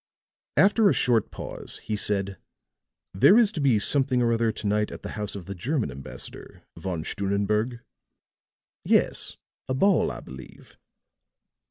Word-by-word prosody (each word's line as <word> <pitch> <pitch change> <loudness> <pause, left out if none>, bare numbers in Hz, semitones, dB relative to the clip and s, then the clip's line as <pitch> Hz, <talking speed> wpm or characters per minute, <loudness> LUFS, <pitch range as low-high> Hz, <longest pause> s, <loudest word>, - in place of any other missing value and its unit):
After 205 +1 +5
a - - +3
short 120 -3 +2
pause - - -6
he 110 - -2
said: 100 -2 -1 0.7
"There 190 - +6
is 225 -4 +5
to 155 - -4
be 130 -6 +4
something 130 +4 +2
or 115 0 +2
other 115 -1 +1
to 105 - -8
night 105 +1 +1
at - - -9
the - - -5
house 105 -1 -4
of 95 -3 -7
the 100 - -5
German 115 - -2
ambassador, 70 +1 -10
Von 90 -4 -4
Stunnenberg?" 105 +6 -1 1.0
"Yes, - - +1 0.3
a 130 - 0
ball, 195 +4 +3
I - - -6
believe." 65 0 -13
105 Hz, 150 wpm, -26 LUFS, 100-130 Hz, 1.0 s, There